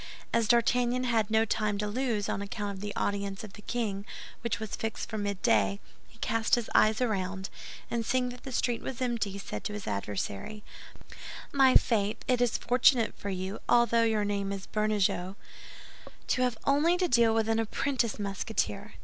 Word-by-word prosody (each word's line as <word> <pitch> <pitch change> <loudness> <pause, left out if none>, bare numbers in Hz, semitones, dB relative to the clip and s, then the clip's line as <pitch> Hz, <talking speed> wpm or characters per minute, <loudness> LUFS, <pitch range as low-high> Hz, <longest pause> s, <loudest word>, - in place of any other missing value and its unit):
As 230 -2 +2
D'Artagnan 245 +1 +3
had 225 -4 +1
no 220 0 +3
time 210 -1 0
to 210 - -1
lose, 220 -1 -1
on - - -2
account 200 0 -4
of 190 - -9
the 205 0 -5
audience 200 0 -2
of 210 -2 -9
the - - -12
king, 210 -3 -2 0.4
which 235 -3 -2
was 220 -1 -4
fixed 220 0 -4
for 220 - -4
midday, 110 - +1 0.3
he - - -21
cast 225 0 +2
his 240 -2 -4
eyes 215 +2 +4
around, 195 -4 -1 0.4
and 235 -1 0
seeing 250 +2 +1
that 245 0 -9
the 265 - -7
street 240 -1 0
was 260 -1 -5
empty, 230 -6 -1
said 105 - -6
to 210 - -3
his 210 -1 -6
adversary, 100 - -4 0.9
"My 270 -2 +5
faith! 210 -3 +3
It 250 -1 +2
is 245 -2 +2
fortunate 245 -1 +3
for 200 - -6
you, 190 +2 -4
although 235 -1 +4
your 220 -2 +2
name 200 -1 -1
is 195 -1 -5
Bernajoux, 205 -3 0 0.9
to 255 - +2
have 250 -3 +1
only 310 +6 +3
to 360 0 +1
deal 235 -5 +4
with 225 -1 +1
an 225 0 +2
apprentice 235 +1 0
Musketeer. 200 +1 -3
220 Hz, 180 wpm, -29 LUFS, 200-240 Hz, 0.9 s, My